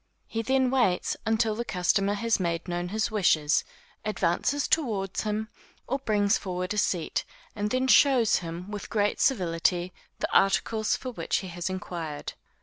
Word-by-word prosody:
He 225 Hz, -, -3 dB
then 260 Hz, +1 st, +2 dB
waits 240 Hz, -9 st, +2 dB
until 220 Hz, 0 st, +2 dB
the 235 Hz, +3 st, -3 dB
customer 195 Hz, 0 st, +1 dB
has 225 Hz, +1 st, +1 dB
made 170 Hz, -1 st, -2 dB
known 175 Hz, 0 st, -2 dB
his 220 Hz, +3 st, -1 dB
wishes, 155 Hz, -8 st, +3 dB, 0.4 s
advances 215 Hz, +7 st, 0 dB
toward 210 Hz, -, 0 dB
him, 215 Hz, 0 st, -2 dB, 0.4 s
or 270 Hz, +3 st, -2 dB
brings 205 Hz, -5 st, +2 dB
forward 185 Hz, +1 st, -3 dB
a -, -, -5 dB
seat, 175 Hz, -5 st, 0 dB, 0.3 s
then 220 Hz, +5 st, 0 dB
shows 260 Hz, -4 st, +5 dB
him, 175 Hz, +3 st, -6 dB
with 205 Hz, -1 st, -6 dB
great 205 Hz, -1 st, 0 dB
civility, 175 Hz, -5 st, +1 dB, 0.2 s
the -, -, -3 dB
articles 215 Hz, +2 st, +2 dB
for 255 Hz, -, -6 dB
which 235 Hz, -, -1 dB
he -, -, -7 dB
has 175 Hz, +1 st, -4 dB
inquired. 170 Hz, -6 st, -5 dB
205 Hz, 150 wpm, -27 LUFS, 180-225 Hz, 0.4 s, shows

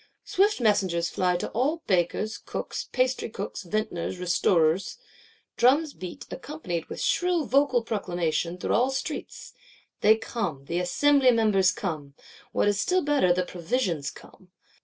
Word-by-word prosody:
Swift 405 Hz, 0 st, +2 dB
messengers 190 Hz, -7 st, +2 dB
fly, 180 Hz, -1 st, +1 dB
to -, -, -4 dB
all 295 Hz, +7 st, 0 dB
bakers, 185 Hz, +4 st, 0 dB
cooks, -, -, -5 dB
pastrycooks, 255 Hz, -5 st, -2 dB
vintners, 185 Hz, -2 st, -3 dB
restorers; 180 Hz, 0 st, +1 dB, 0.6 s
drums 285 Hz, +5 st, +3 dB
beat, 180 Hz, -2 st, -8 dB
accompanied 260 Hz, -, -5 dB
with -, -, -8 dB
shrill 355 Hz, -3 st, +1 dB
vocal 270 Hz, -3 st, +2 dB
proclamation, 175 Hz, -5 st, -2 dB
through -, -, -2 dB
all 250 Hz, +4 st, +3 dB
streets. 270 Hz, -, -5 dB, 0.5 s
They 220 Hz, +1 st, +5 dB
come: 200 Hz, -, -4 dB
the 170 Hz, +4 st, -2 dB
Assembly 265 Hz, +10 st, +3 dB
Members 215 Hz, -6 st, +4 dB
come; 150 Hz, -7 st, -5 dB, 0.4 s
what -, -, +1 dB
is 205 Hz, -1 st, +2 dB
still 365 Hz, 0 st, +1 dB
better, 285 Hz, -11 st, +3 dB
the 180 Hz, +1 st, +1 dB
provisions 175 Hz, -, -2 dB
come. 185 Hz, -, -16 dB
205 Hz, 135 wpm, -26 LUFS, 175-260 Hz, 0.6 s, They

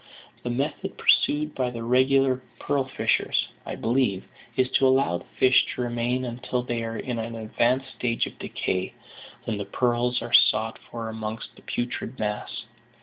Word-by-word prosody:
The 125 Hz, -, -4 dB
method 135 Hz, +5 st, -2 dB
pursued 150 Hz, +1 st, +3 dB
by 130 Hz, -2 st, 0 dB
the 115 Hz, -1 st, -6 dB
regular 130 Hz, +1 st, +3 dB, 0.2 s
pearl 140 Hz, -2 st, 0 dB
fishers, 130 Hz, -, +1 dB, 0.2 s
I -, -, -3 dB
believe, 115 Hz, -5 st, +1 dB, 0.3 s
is 130 Hz, -, +4 dB
to 135 Hz, -, +4 dB
allow 130 Hz, -10 st, +3 dB
the -, -, -15 dB
fish 130 Hz, -1 st, +6 dB
to -, -, -3 dB
remain 120 Hz, +1 st, 0 dB
until 125 Hz, +1 st, -2 dB
they 120 Hz, -2 st, -2 dB
are 115 Hz, 0 st, -3 dB
in 120 Hz, 0 st, -3 dB
an 115 Hz, +1 st, -4 dB
advanced 120 Hz, +4 st, 0 dB
stage 115 Hz, -1 st, 0 dB
of -, -, -10 dB
decay, 95 Hz, 0 st, -2 dB, 0.5 s
when 110 Hz, -2 st, -2 dB
the 100 Hz, -, -3 dB
pearls 120 Hz, +3 st, +1 dB
are 120 Hz, -, -7 dB
sought 110 Hz, +1 st, +4 dB
for 115 Hz, -1 st, -5 dB
amongst 110 Hz, 0 st, -5 dB
the -, -, -16 dB
putrid 120 Hz, +1 st, -3 dB
mass. 105 Hz, +1 st, -3 dB
120 Hz, 165 wpm, -26 LUFS, 115-130 Hz, 0.5 s, fish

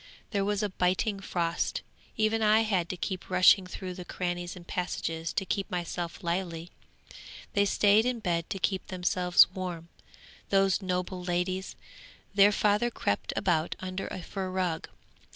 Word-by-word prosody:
There 200 Hz, -3 st, +1 dB
was 205 Hz, +1 st, 0 dB
a 210 Hz, -, 0 dB
biting 185 Hz, +3 st, 0 dB
frost. 170 Hz, -3 st, -1 dB, 0.3 s
Even 220 Hz, +1 st, +2 dB
I 215 Hz, +1 st, +5 dB
had 190 Hz, -6 st, 0 dB
to 185 Hz, -, -4 dB
keep 185 Hz, 0 st, -4 dB
rushing 185 Hz, +1 st, +6 dB
through 185 Hz, 0 st, -6 dB
the 180 Hz, 0 st, -7 dB
crannies 175 Hz, -1 st, -3 dB
and 175 Hz, -1 st, -11 dB
passages 165 Hz, -2 st, -3 dB
to 195 Hz, -, -1 dB
keep 195 Hz, +2 st, -2 dB
myself 175 Hz, -1 st, -4 dB
lively. 170 Hz, -1 st, -3 dB, 0.8 s
They 200 Hz, 0 st, +3 dB
stayed 205 Hz, +2 st, +4 dB
in 250 Hz, -2 st, -1 dB
bed 170 Hz, -5 st, -1 dB
to -, -, -3 dB
keep 190 Hz, +1 st, -1 dB
themselves 180 Hz, -1 st, +4 dB
warm, 180 Hz, -3 st, -5 dB, 0.6 s
those 195 Hz, 0 st, +3 dB
noble 180 Hz, 0 st, -2 dB
ladies. 180 Hz, +1 st, -2 dB, 0.6 s
Their 200 Hz, +1 st, +6 dB
father 210 Hz, +3 st, +2 dB
crept 100 Hz, -, -1 dB
about 165 Hz, -3 st, +1 dB
under 185 Hz, +1 st, -4 dB
a 185 Hz, -, -6 dB
fur 190 Hz, 0 st, -4 dB
rug. 180 Hz, -3 st, -2 dB
185 Hz, 150 wpm, -29 LUFS, 175-200 Hz, 0.8 s, rushing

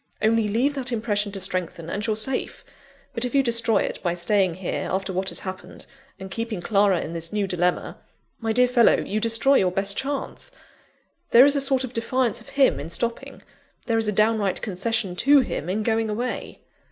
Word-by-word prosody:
Only 220 Hz, 0 st, +2 dB
leave 250 Hz, +7 st, +1 dB
that 260 Hz, -3 st, -2 dB
impression 210 Hz, -3 st, 0 dB
to 195 Hz, -, -4 dB
strengthen, 185 Hz, -3 st, -3 dB
and 205 Hz, +5 st, -3 dB
you're 215 Hz, -, +1 dB
safe. 250 Hz, +5 st, -2 dB, 0.5 s
But 230 Hz, -, -2 dB
if 250 Hz, +2 st, 0 dB
you 275 Hz, -, +4 dB
destroy 230 Hz, -3 st, +2 dB
it -, -, -5 dB
by 175 Hz, -2 st, -1 dB
staying 185 Hz, 0 st, +1 dB
here, 185 Hz, 0 st, -4 dB
after 190 Hz, 0 st, -2 dB
what 190 Hz, +1 st, -1 dB
has -, -, -4 dB
happened, 185 Hz, -1 st, -8 dB, 0.3 s
and 190 Hz, 0 st, -9 dB
keeping 230 Hz, -1 st, -4 dB
Clara 195 Hz, -1 st, +2 dB
in 165 Hz, -, -6 dB
this 165 Hz, 0 st, -4 dB
new 210 Hz, -1 st, 0 dB
dilemma 180 Hz, -1 st, -1 dB, 0.4 s
my 225 Hz, -1 st, -1 dB
dear 250 Hz, +2 st, +4 dB
fellow, 245 Hz, -2 st, +4 dB
you 215 Hz, -, -2 dB
destroy 230 Hz, +5 st, +3 dB
your 185 Hz, -1 st, +2 dB
best 195 Hz, +2 st, -2 dB
chance! 280 Hz, -, -3 dB, 0.8 s
There 245 Hz, +3 st, +8 dB
is 285 Hz, 0 st, +4 dB
a 280 Hz, -, +1 dB
sort 270 Hz, -1 st, +2 dB
of 255 Hz, -1 st, -6 dB
defiance 245 Hz, +1 st, 0 dB
of -, -, -15 dB
him 275 Hz, -1 st, +3 dB
in 150 Hz, -, -6 dB
stopping; 230 Hz, +7 st, -4 dB, 0.4 s
there 225 Hz, -2 st, +1 dB
is 220 Hz, -, -1 dB
a -, -, +2 dB
downright 215 Hz, -2 st, +1 dB
concession 200 Hz, 0 st, -1 dB
to 280 Hz, +5 st, +5 dB
him 175 Hz, -, -4 dB
in 210 Hz, +4 st, -1 dB
going 225 Hz, 0 st, 0 dB
away." 240 Hz, +4 st, -4 dB
215 Hz, 200 wpm, -24 LUFS, 190-240 Hz, 0.8 s, There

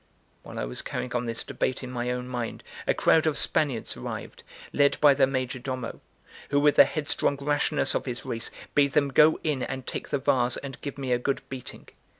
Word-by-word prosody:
While -, -, -10 dB
I -, -, -1 dB
was -, -, -4 dB
carrying 125 Hz, -, -4 dB
on 120 Hz, 0 st, -1 dB
this 115 Hz, -1 st, -2 dB
debate 130 Hz, -, -2 dB
in 125 Hz, -, -6 dB
my 120 Hz, -1 st, -2 dB
own 125 Hz, 0 st, -3 dB
mind, 120 Hz, -2 st, -4 dB, 0.2 s
a -, -, +4 dB
crowd 160 Hz, 0 st, +4 dB
of 150 Hz, -, +1 dB
Spaniards 135 Hz, -7 st, +1 dB
arrived, -, -, -7 dB, 0.3 s
led 145 Hz, 0 st, +3 dB
by 145 Hz, -2 st, +7 dB
their 135 Hz, -1 st, +4 dB
major 130 Hz, -1 st, -2 dB
domo, 130 Hz, -2 st, -5 dB, 0.5 s
who, 145 Hz, -, +3 dB
with 145 Hz, 0 st, +4 dB
the -, -, +10 dB
headstrong 145 Hz, -2 st, -1 dB
rashness 145 Hz, +1 st, +1 dB
of -, -, -1 dB
his 125 Hz, -1 st, -4 dB
race, 115 Hz, 0 st, -3 dB, 0.2 s
bade 140 Hz, -2 st, +3 dB
them 145 Hz, -1 st, +3 dB
go 150 Hz, +4 st, +5 dB
in 150 Hz, -5 st, 0 dB
and 130 Hz, 0 st, -4 dB
take -, -, -5 dB
the -, -, +1 dB
vase 125 Hz, -2 st, +1 dB
and 135 Hz, -2 st, -8 dB
give 140 Hz, -, -6 dB
me 135 Hz, -2 st, -3 dB
a 120 Hz, -, +3 dB
good 135 Hz, +2 st, -1 dB
beating. 130 Hz, -2 st, -8 dB
130 Hz, 210 wpm, -27 LUFS, 125-145 Hz, 0.5 s, the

